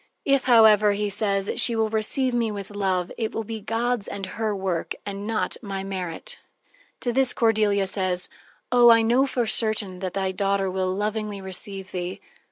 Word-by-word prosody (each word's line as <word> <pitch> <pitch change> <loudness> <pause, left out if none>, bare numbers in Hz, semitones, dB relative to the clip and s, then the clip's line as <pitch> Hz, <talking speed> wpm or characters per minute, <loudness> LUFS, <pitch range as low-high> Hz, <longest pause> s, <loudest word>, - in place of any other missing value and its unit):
"If, 275 -1 +2
however," 215 -4 +6
he 205 0 -2
says, 200 -1 -1
"she 235 - +4
will 220 -1 0
receive 240 +4 0
me 230 -2 0
with 200 -1 -6
love, 190 -3 -1
it 220 -2 -2
will 225 - -2
be 220 0 -6
God's 230 +1 -1
and 195 - -5
her 215 +2 -2
work, 190 -4 -2
but 200 - -4
not 215 +2 -2
my 195 -3 -5
merit." 195 - -5 0.6
To 240 - -1
this 265 0 +2
Cordelia 215 -3 +2
says: 185 -2 -1 0.4
"Oh, 245 -1 +7
I 230 -1 +6
know 245 +5 +3
for 245 -3 -1
certain 215 -4 +1
that 185 -1 -4
thy 190 -1 0
daughter 195 0 0
will 185 0 -1
lovingly 210 +1 -2
receive 190 0 -7
thee." 180 0 -4
205 Hz, 175 wpm, -24 LUFS, 195-225 Hz, 0.6 s, Oh